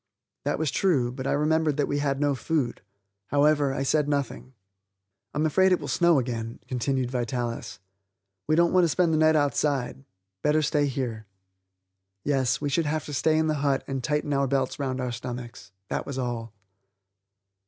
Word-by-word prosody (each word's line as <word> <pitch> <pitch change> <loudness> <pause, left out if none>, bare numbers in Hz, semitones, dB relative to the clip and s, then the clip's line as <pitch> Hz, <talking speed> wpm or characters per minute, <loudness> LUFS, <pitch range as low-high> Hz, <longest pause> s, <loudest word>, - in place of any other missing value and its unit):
That - - 0
was 155 -4 0
true, 140 -11 +2
but 130 +1 -5
I - - +1
remembered 155 0 +1
that 145 - +1
we 145 - -1
had 140 -1 0
no 145 -1 +2
food. 140 -1 -1 0.5
However, 145 -1 +3
I 135 0 -2
said 145 +1 +1
nothing. 140 -2 -3 0.8
"I'm 150 +2 0
afraid 190 +5 +4
it 180 - +3
will - - -6
snow 170 -3 +3
again," 115 -3 -3
continued 130 0 -1
Vitalis. 120 -1 -3 0.7
"We 155 - +3
don't 170 +1 +3
want 185 -1 +5
to 170 - +3
spend 170 +1 +2
the 155 - +2
night 155 0 +5
outside. 140 -2 0 0.4
Better 150 +3 +2
stay 145 0 +2
here." 120 -5 -4 1.0
Yes, 135 -4 +1
we - - -2
should 155 +2 +1
have 155 0 -1
to 145 - -7
stay 155 +3 +2
in 160 - +2
the 155 -2 0
hut 140 -2 +1
and 135 -2 -3
tighten 150 +1 0
our 140 0 +2
belts 135 0 -1
round 130 -2 -2
our 125 -1 -2
stomachs, 120 -3 -7 0.2
that - - -3
was 140 -2 -4
all. 120 -3 -3
140 Hz, 180 wpm, -26 LUFS, 130-155 Hz, 1.0 s, want